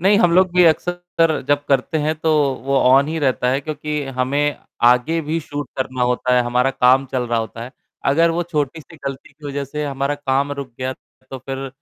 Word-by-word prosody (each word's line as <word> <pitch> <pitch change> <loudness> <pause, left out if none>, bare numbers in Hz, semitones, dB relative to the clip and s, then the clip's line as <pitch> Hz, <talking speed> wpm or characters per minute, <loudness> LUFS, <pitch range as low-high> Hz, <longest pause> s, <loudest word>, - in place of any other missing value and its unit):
नहीं, 200 +3 +4
हम 175 -5 +4
लोग 185 0 +4
भी 180 -1 +6
अक्सर 170 -1 +1
जब 145 0 +2
करते 145 +3 +1
हैं 155 +1 0
तो 160 - +1 0.3
वो 140 0 +1
ऑन 135 +3 +4
ही 160 +1 -2
रहता 130 -4 +1
है 135 +2 0
क्योंकि 150 0 -4 0.2
हमें 140 +3 +1 0.3
आगे 125 +7 +4
भी 155 +2 -2
शूट 145 -1 -6
करना 130 -1 -2
होता 125 0 +1
है, 125 - +4
हमारा 125 +2 +1
काम 130 +1 +4
चल 130 -1 -2
रहा 115 0 +1
होता 115 +1 -5
है। 125 - -11 0.3
अगर 165 +5 +4
वो 170 +1 -1
छोटी-सी 160 -1 -4
गलती 135 -1 -6
की 150 - -12
वजह 140 0 -3
से 150 +2 -4
हमारा 140 0 -1
काम 140 0 -1
रुक 140 -3 -6
गया 130 0 -2 0.4
तो 130 - -6
फिर 135 +1 -6
140 Hz, 210 wpm, -20 LUFS, 130-160 Hz, 0.4 s, भी